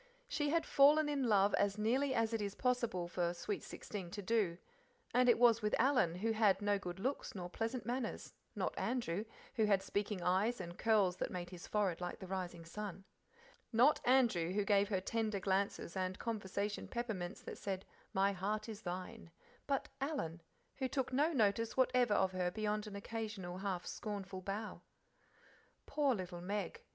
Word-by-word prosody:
She 295 -1 0
had 330 +2 +2
fallen 295 +2 +6
in 280 -4 0
love 200 -1 +4
as 200 0 +2
nearly 260 +5 +2
as 230 0 +1
it 225 - 0
is 200 -1 -3
possible 235 -8 0
for 175 0 -1
sweet 195 +4 -3
sixteen 195 -5 -6
to 205 +3 -6
do; 195 -5 +1 0.6
and 250 0 +5
it 240 - +6
was 235 -1 +6
with 210 0 +1
Alan, 250 -11 +3
who 220 +5 0
had 215 -3 +4
no 205 -1 +1
good 180 -1 -6
looks 260 +3 -2
nor 180 -2 -5
pleasant 230 +2 -2
manners 245 0 -3 0.2
not - - -1
Andrew, 225 -5 -1 0.3
who 220 - +4
had 200 -2 +3
speaking 200 -1 -2
eyes, 200 +7 +2
and 175 -2 -6
curls 205 -5 +3
that - - -2
"made 175 0 -5
his 175 -2 -9
forehead 195 -5 0
like 180 - -3
the 190 - -8
rising 180 -3 -4
sun"; 195 +2 -6 0.7
not 250 +7 +5
Andrew, 230 -10 +3
who 205 0 +1
gave 200 0 +3
her 190 -3 0
tender 215 0 -1
glances 195 -2 -1
and 185 0 -1
conversation 205 -2 -3
peppermints 215 -6 -4
that - - -7
said 195 -1 -3 0.3
"My 195 +1 +3
heart 210 +3 -2
is 220 -1 -7
thine," 185 +1 -6 0.4
but 275 -2 0
Alan, 265 - -2 0.4
who 265 - 0
took 260 0 -2
no 295 +5 +3
notice 225 -4 +1
whatever 250 -4 +4
of 190 -2 +3
her 180 -1 0
beyond 210 +2 -2
an 205 - -7
occasional 200 -4 -5
half 190 -3 -2
scornful 195 -3 -5
bow. 200 +3 -4 1.0
Poor 285 -4 +2
little 180 -3 -5
Meg! 205 - -3
205 Hz, 175 wpm, -37 LUFS, 185-230 Hz, 1.0 s, fallen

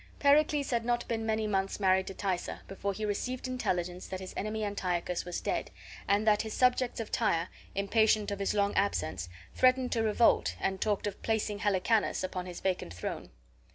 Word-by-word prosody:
Pericles 290 0 +3
had 235 -1 +1
not 240 0 0
been 225 -1 -2
many 220 0 +1
months 195 -1 -1
married 190 -1 +3
to 195 - -6
Thaisa 185 -3 -2
before 195 +1 -3
he 215 +2 -4
received 250 +5 -2
intelligence 180 -8 -2
that 185 - -5
his 185 -1 -8
enemy 215 +1 -2
Antiochus 180 -3 -2
was 175 -1 -3
dead, - - -2 0.4
and 200 +2 +2
that 210 -1 +4
his 220 -1 -5
subjects 250 -1 +2
of 225 - -5
Tyre, 175 -6 +1 0.3
impatient 210 +1 +2
of 200 - -3
his 200 +1 0
long 200 0 +2
absence, 90 - 0 0.2
threatened 255 0 +3
to 230 - +1
revolt 225 +1 +3
and 190 -1 -1
talked 210 -2 0
of 205 - -4
placing 215 -2 -1
Helicanus 205 +1 +1
upon 185 -1 -3
his 180 - -7
vacant 180 - -2
throne. 85 - -5
205 Hz, 185 wpm, -31 LUFS, 190-225 Hz, 0.4 s, that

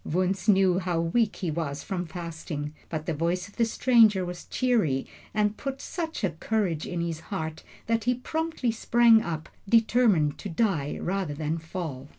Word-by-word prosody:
Wunzh 185 +5 -1
knew 190 -3 +5
how 180 -3 -1
weak 205 +7 +1
he 175 -4 -2
was 150 -3 -3
from 180 -3 -3
fasting, 160 -3 -5 0.2
but 155 -1 -4
the 165 - -1
voice 170 +4 -1
of 200 - -19
the 235 - +4
stranger 225 -5 +4
was 175 0 -7
cheery 215 - +1 0.3
and 210 0 +1
put 275 -1 -4
such 325 -6 -4
a 190 - +2
courage 170 -1 -1
in 175 -1 -2
his 165 -2 -3
heart, 160 0 -4 0.2
that 225 0 0
he 250 0 +3
promptly 315 -1 -2
sprang 230 0 +5
up, 160 -4 -4 0.2
determined 220 - +3
to 205 - -5
die 165 -6 0
rather 185 -5 -2
than 155 +2 -2
fail. 160 -5 -6
185 Hz, 170 wpm, -27 LUFS, 160-225 Hz, 0.3 s, knew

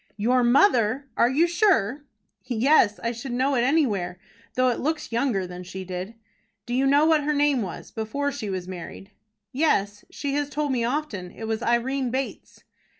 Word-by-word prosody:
"Your 245 +4 +2
mother! 245 - +3
Are 235 - +4
you 295 +6 +3
sure?" 325 - +1 0.4
"Yes; 245 -2 +3
I 235 - 0
should 240 +2 -6
know 260 +3 +1
it 245 - +2
anywhere, 215 - +1 0.4
though 255 0 +3
it 240 - -1
looks 310 -1 -2
younger 230 -5 0
than 180 0 -8
she 185 +1 -7
did." 185 +4 -6 0.5
"Do 240 - -5
you 265 +2 +2
know 285 +2 +4
what 315 -2 +3
her 300 +1 0
name 285 -3 +2
was, 185 -5 -7
before 280 +6 -2
she 250 -7 -5
was 185 -2 -4
married?" 185 +2 -9 0.4
"Yes; 210 -8 0
she 280 -1 -4
has 290 0 -1
told 295 -1 -2
me 245 -3 0
often. 235 -8 -3
It 225 - -11
was 220 0 -2
Irene 245 +2 0
Bates." 265 +2 -5
245 Hz, 180 wpm, -25 LUFS, 210-285 Hz, 0.5 s, Are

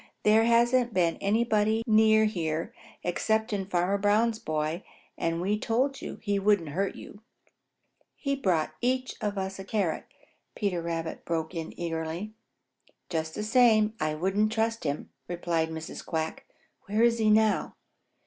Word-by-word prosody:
"There 220 +1 +5
hasn't 235 0 +3
been 170 -2 +2
anybody 220 +1 +1
near 220 -1 +5
here 165 -6 -2 0.3
excepting 210 +2 0
Farmer 185 +2 +1
Brown's 215 +3 +2
boy, 155 +3 -2 0.3
and 165 0 -1
we 200 +4 0
told 260 +6 0
you - - -6
he 205 -2 +1
wouldn't 195 -5 +2
hurt 190 +6 -1
you." 205 - -11 0.9
"He 275 -1 -1
brought 180 - +1
us - - -25
each 255 +1 0
a 195 -2 -3
carrot," 190 -4 -1 0.5
Peter 195 -5 -1
Rabbit 165 -1 -4
broke 165 0 -2
in 165 -2 -6
eagerly. 165 +4 -3 0.8
"Just 160 -2 -2
the 210 - -3
same, 220 -2 +4
I 155 0 0
wouldn't 195 +6 +1
trust 225 -2 -1
him," 145 0 -3 0.2
replied 170 -2 -1
Mrs. 160 0 -7
Quack. 160 0 -3 0.4
"Where 215 +3 +2
is 235 -1 +3
he 215 -1 +3
now?" 215 0 +3
200 Hz, 140 wpm, -28 LUFS, 165-220 Hz, 0.9 s, There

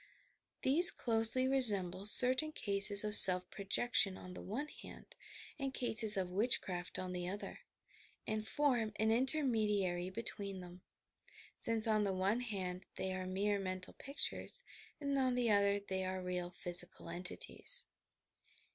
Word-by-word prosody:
These 320 +7 +3
closely 230 +2 -1
resemble 200 -8 0
certain 260 +8 +3
cases 200 -2 +4
of 210 0 -1
self 180 -2 +10
projection 200 -1 +1
on 185 - -12
the - - -10
one 250 +10 -6
hand - - -14 0.4
and 270 -1 -5
eases 220 -4 +4
of 185 -2 -4
witchcraft 185 -4 -1
on 185 -1 -6
the 180 -1 -5
other, 200 +2 -8 0.7
and 215 0 -5
form 245 -7 -1
an 220 +1 -1
intermediary 215 - 0
be 225 +5 -8
tween 200 -3 -6
them, 180 0 -13 0.4
— - - -50 0.3
since 225 -1 -2
on 215 -2 0
the 195 -2 -2
one 195 +5 -2
hand 190 -6 -6
they 190 0 -4
are 185 0 -6
mere 200 +2 -2
mental 185 -1 -5
pictures 285 - -5 0.4
and 280 -1 -4
on 255 -1 -1
the 240 -3 0
other 200 0 +1
they 190 -1 -5
are 185 0 -5
real 180 -1 -5
physical 175 0 +2
entities. 180 - 0
205 Hz, 145 wpm, -34 LUFS, 185-240 Hz, 0.7 s, self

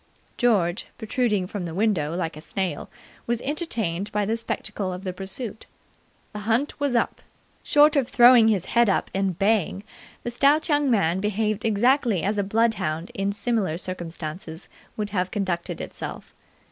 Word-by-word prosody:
George, 205 -6 +1
protruding 220 -4 0
from 185 -1 -5
the 165 -1 -6
window 180 -7 +1
like 165 -4 -2
a 155 - -9
snail, 190 +2 -3 0.4
was 235 -1 0
entertained 220 - -2
by 210 0 0
the 220 +3 0
spectacle 210 -4 -4
of 180 +1 -6
the 185 -2 -3
pursuit. 195 +4 -5 0.7
The 210 - -5
hunt 230 +9 0
was 285 -3 0
up. 235 - 0 0.4
Short 295 +1 +5
of 275 -4 +2
throwing 240 -2 +7
his 200 -5 +2
head 235 -2 +3
up 195 - 0
and 190 -3 0
baying, 200 -2 +1 0.4
the 240 - -3
stout 285 +7 +3
young 290 -2 +3
man 190 -6 +2
behaved 210 +1 -1
exactly 230 - +2
as 205 +1 0
a - - +2
bloodhound 195 -6 0
in 195 +1 -1
similar 205 -5 -1
circumstances 170 -2 -6 0.3
would 210 -1 -3
have 185 -2 0
conducted 185 -4 -2
itself. - - -7
205 Hz, 160 wpm, -24 LUFS, 185-235 Hz, 0.7 s, throwing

